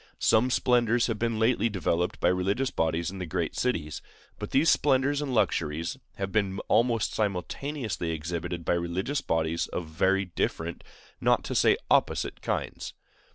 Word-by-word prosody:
Some 115 +3 +3
splendors 120 -2 +3
have 115 -3 -2
been 115 -1 0
lately 115 0 +2
developed 90 -3 -1
by - - +3
religious 100 +9 0
bodies 80 +1 0
in 95 - -8
the 90 - -3
great 85 0 -2
cities; 80 -12 -1 0.4
but - - -5
these 140 +5 +3
splendors 140 0 +3
and 145 -2 -3
luxuries 85 -7 0 0.2
have 95 -1 -4
been 100 -2 0
almost 115 0 +2
simultaneously 105 - -2
exhibited 85 +2 -4
by - - +2
religious 85 +11 -1
bodies 80 0 0
of 90 - -4
very 95 +5 +1
different, 85 -1 -3 0.4
not - - +3
to - - -4
say - - +4
opposite, - - +1
kinds. - - -3
95 Hz, 155 wpm, -28 LUFS, 85-120 Hz, 0.4 s, say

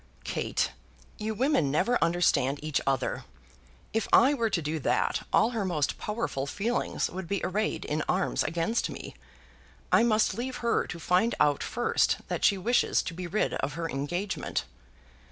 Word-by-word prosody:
"Kate, - - -1 0.5
you 220 +1 -2
women 250 - +2
never 185 - +2
understand 165 -5 +2
each 155 -2 0
other. 135 -2 0 0.7
If 225 -1 0
I 265 +5 +6
were 230 -5 0
to 195 - 0
do 155 0 -2
that, - - +1
all 225 - +4
her 225 -4 -1
most 160 -7 -1
powerful 210 -11 -2
feelings 225 +10 -1
would 185 0 -6
be 200 +2 -1
arrayed 210 +4 -1
in 150 +1 -1
arms 185 0 +1
against 170 +8 0
me. - - -8 0.8
I - - +6
must 220 -2 +3
leave 255 +2 -4
her 235 - +2
to 175 - -6
find 180 +7 +2
out 145 -1 +3
first 240 - +1
that - - -2
she 200 - +5
wishes 235 +6 +2
to - - -5
be 180 +1 -5
rid 205 +5 0
of 140 - -2
her 165 +2 -3
engagement." 175 +8 -2
185 Hz, 165 wpm, -28 LUFS, 160-225 Hz, 0.8 s, I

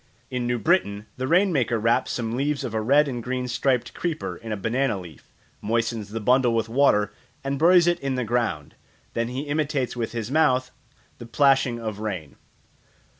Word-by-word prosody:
In 125 -1 -2
New 120 0 0
Britain 110 - +1
the 130 +1 -2
rain 180 +4 +3
maker 120 -5 +1
wraps 115 +2 +1
some 115 -1 -2
leaves 140 +2 -1
of 115 - -4
a 110 - 0
red 140 +6 +4
and 125 -3 -4
green 125 +1 -3
striped 125 0 0
creeper 165 -3 -3
in 115 - -8
a 105 - -2
banana 115 +1 0
leaf, 85 -6 -13 0.3
moistens 115 -1 -1
the 115 +2 -4
bundle 125 +1 +3
with 115 -1 0
water, 110 -5 +2 0.3
and 135 0 -2
buries 175 +2 +6
it 175 0 +2
in 135 -1 -2
the 125 - -1
ground; 110 -10 -1 0.4
then 115 0 -1
he 125 +3 -4
imitates 145 -3 -1
with 115 -2 -3
his 115 0 -4
mouth 130 -4 +2 0.5
the 120 - -9
plashing 130 -2 +3
of 110 -3 -5
rain. 95 -9 -5
125 Hz, 185 wpm, -24 LUFS, 115-140 Hz, 0.5 s, buries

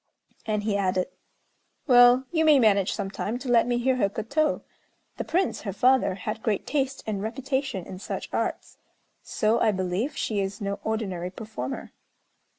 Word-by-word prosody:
And 210 -1 0
he 205 -1 0
added, 185 0 0 0.8
"Well, 245 0 +6
you 320 -2 +2
may 305 -2 +6
manage 200 -5 +3
some 195 -2 -3
time 215 +3 -3
to 255 - -8
let 235 -1 +4
me 240 -1 +1
hear 255 +1 +1
her 200 -5 +2
koto. 255 +10 -1 0.5
The - - -2
Prince, 360 +4 0
her 200 - -4
father, 250 -2 +3
had 215 +3 -5
great 210 -3 -1
taste 270 -2 -1
and 210 -3 -2
reputation 260 -2 -2
in 185 - -8
such - - -5
arts; - - -3 0.4
so, 220 +2 +1
I 225 - +3
believe, 190 +7 -2
she 210 -2 -1
is 195 +2 -3
no 200 -1 -3
ordinary 195 -6 -2
performer." 220 +7 -6
220 Hz, 165 wpm, -26 LUFS, 200-260 Hz, 0.8 s, Well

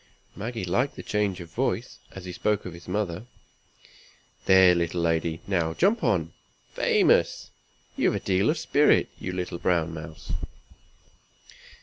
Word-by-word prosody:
Maggie 110 -1 -4
liked 120 +11 0
the - - -8
change 105 -3 -1
of 85 -1 -11
voice, 120 0 -2
as 95 -1 -10
he 90 - -5
spoke 105 +3 -1
of 90 - -6
his 85 0 -13
mother. 95 +2 -3 1.2
"There, 95 -1 +7
little 85 0 -1
lady! 80 0 0
now 85 -4 0
jump 210 +5 +2
down. 85 -5 0 0.4
Famous! - - +2 0.4
you've - - +2
a - - -1
deal 95 +5 +1
of 160 - +1
spirit, 150 -1 +3
you 90 - -4
little 90 -1 -4
brown 85 -2 +1
mouse." 80 0 -8
90 Hz, 140 wpm, -26 LUFS, 85-105 Hz, 1.2 s, There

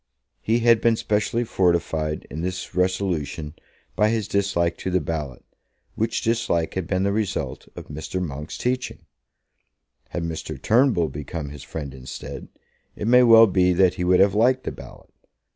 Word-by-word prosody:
He 115 +2 +1
had 115 -1 +5
been 115 -1 +3
specially 110 +2 0
fortified 85 -6 0
in 80 - -5
this 90 +1 -4
resolution 90 -5 -1 0.4
by 105 0 +3
his 110 -2 -1
dislike 95 -4 0
to - - -4
the 90 0 +2
ballot, 75 -5 -5 0.5
which 110 +1 -1
dislike 115 -8 0
had 95 -3 -3
been 95 0 0
the 100 - +1
result 105 -1 -3
of - - -8
Mr. 80 +5 -5
Monk's 75 -3 -5
teaching. 125 +1 -3 1.0
Had 85 - -4
Mr. 80 -1 -5
Turnbull 115 - +3
become 75 +1 -6
his 75 -1 -10
friend 70 -1 -7
instead, 65 -1 -8 0.5
it 105 - -4
may 125 +1 +6
well 115 -2 +8
be 90 -3 +2
that 90 0 +4
he 90 - -4
would 90 0 +4
have 100 0 +4
liked 125 +5 +3
the - - -3
ballot. - - -13
95 Hz, 160 wpm, -23 LUFS, 80-110 Hz, 1.0 s, well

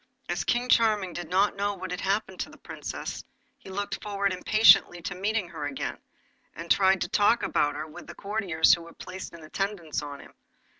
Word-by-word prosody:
As - - -1
King 245 +1 0
Charming 215 -7 +3
did 175 -2 -6
not 195 +3 +2
know 200 0 -1
what 185 -2 -6
had 180 - -3
happened 195 -1 -1
to - - -3
the - - -15
Princess, - - -6 0.4
he - - -13
looked 200 +2 -4
forward 200 -2 -1
impatiently 200 -1 +5
to 180 - -3
meeting 200 0 -1
her 160 -4 -5
again, 135 -2 -4 0.6
and 165 - -6
he 170 - +4
tried 190 -1 +3
to - - 0
talk 205 +4 +3
about 145 -1 +1
her 150 +1 -4
with 155 - -11
the - - -9
courtiers 195 -6 +2
who 170 - +1
were 170 0 -12
placed 185 +1 -8
in 170 -2 -12
attendance 175 -1 -3
on 145 -1 -7
him. - - -15
190 Hz, 205 wpm, -27 LUFS, 170-205 Hz, 0.6 s, impatiently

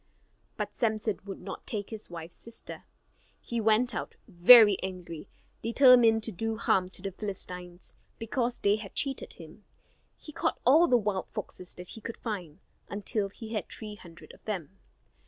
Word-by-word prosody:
But - - -4
Samson 215 -3 0
would 195 -1 -7
not - - -8
take 205 -1 -4
his 220 -1 -8
wife's 170 -1 -8
sister. 230 - -11 0.5
He 235 -1 -3
went 225 +3 +3
out - - -5
very 205 +2 +8
angry; 180 -3 -7 0.3
determined 235 -2 +6
to 225 - -2
do 225 +4 -3
harm 185 -5 +2
to 185 - -9
the 195 - -3
Philistines, 180 -3 -6 0.2
because 235 +1 -1
they 205 +1 +3
had 210 -3 -10
cheated 270 -2 -2
him. 165 +5 -13 0.5
He 305 - -11
caught - - -1
all 310 +8 +6
the 250 - +5
wild 205 -4 -1
foxes 180 -1 -7
that 180 0 -10
he 225 - -10
could 230 - -6
find, 190 -7 -6 0.3
until 205 0 -2
he 225 +2 -9
had 215 - -3
three 215 -2 -7
hundred 170 -5 -13
of - - -19
them. 195 -4 -5
210 Hz, 165 wpm, -29 LUFS, 185-230 Hz, 0.5 s, very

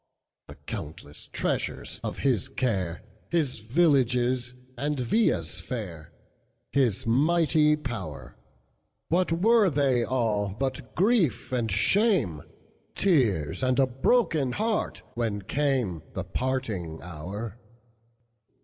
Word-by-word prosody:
The - - -10
countless 75 -1 -7
treasures - - -2
of - - -3
his 125 -9 +1
care, 95 - -1 0.3
His 155 -9 0
villages 125 -2 +2 0.2
and 145 +2 -2
villas 210 - +1
fair, 90 - -6 0.6
His 125 -8 +1
mighty 150 +4 +3
power, 80 - -6 0.7
What 175 +1 +2
were 205 +4 +4
they 135 -5 +2
all 105 -6 0
but 135 -2 -3
grief 190 - +2
and 120 -4 0
shame, 135 - +2 0.5
Tears 120 - +2
and 130 0 +2
a 135 - +6
broken 135 - +1
heart, 220 0 -1
when 110 -4 -2
cameThe 95 - -2
parting 110 -11 -2
hour? 95 +7 -6
125 Hz, 100 wpm, -27 LUFS, 105-150 Hz, 0.7 s, a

